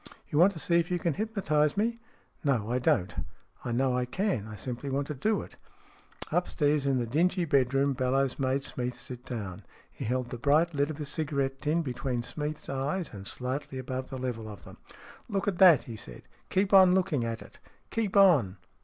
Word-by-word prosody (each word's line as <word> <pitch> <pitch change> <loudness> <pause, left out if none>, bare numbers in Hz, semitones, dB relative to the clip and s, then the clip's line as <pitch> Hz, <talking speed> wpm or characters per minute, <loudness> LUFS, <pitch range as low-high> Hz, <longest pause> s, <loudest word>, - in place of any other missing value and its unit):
" - - -31
You 150 - +2
want 185 +4 +7
to - - -9
see 170 +2 +2
if 170 +1 -1
you 180 - +1
can 170 -2 0
hypnotize 180 -8 0
me? 230 +3 +1 0.2
" - - -34
" - - -38
No, 120 -7 +1
I 125 - +1
don't. 95 -7 +1 0.5
I 120 - -3
know 130 +1 +1
I 125 0 0
can. 125 - -1
I 110 - -8
simply 125 +6 -5
want 140 +1 -1
to - - -1
do 210 +11 0
it." - - -14 0.7
Upstairs 150 -5 +1
in 135 -1 +2
the 120 - 0
dingy 175 - +1
bedroom 140 -1 +2
Bellowes 130 +1 0
made 135 +1 0
Smeath 125 -2 -2
sit 125 0 -7
down. 100 -7 -5 0.3
He - - -7
held 125 +1 -1
the 125 - -5
bright 155 +6 +3
lid 145 0 +1
of 155 -1 -6
a 150 - -3
cigarette 140 -2 -2
tin 160 +3 +1
between 125 -2 -2
Smeath's 150 +3 -4
eyes 140 +6 -2
and 100 -1 -8
slightly 130 +2 -4
above 130 0 -4
the 130 - -5
level 120 -4 -4
of 105 - -10
them. - - -12 0.3
" - - -19
Look 200 -2 -1
at 190 -4 -1
that," 175 -8 +8
he 115 - -8
said. 60 - -10 0.2
" - - -36
Keep 195 +1 +1
on 190 -2 +8
looking 175 -9 +1
at 115 -1 -3
it. - - -17 0.3
Keep 215 -3 0
on 145 - +5
140 Hz, 215 wpm, -29 LUFS, 125-170 Hz, 0.7 s, that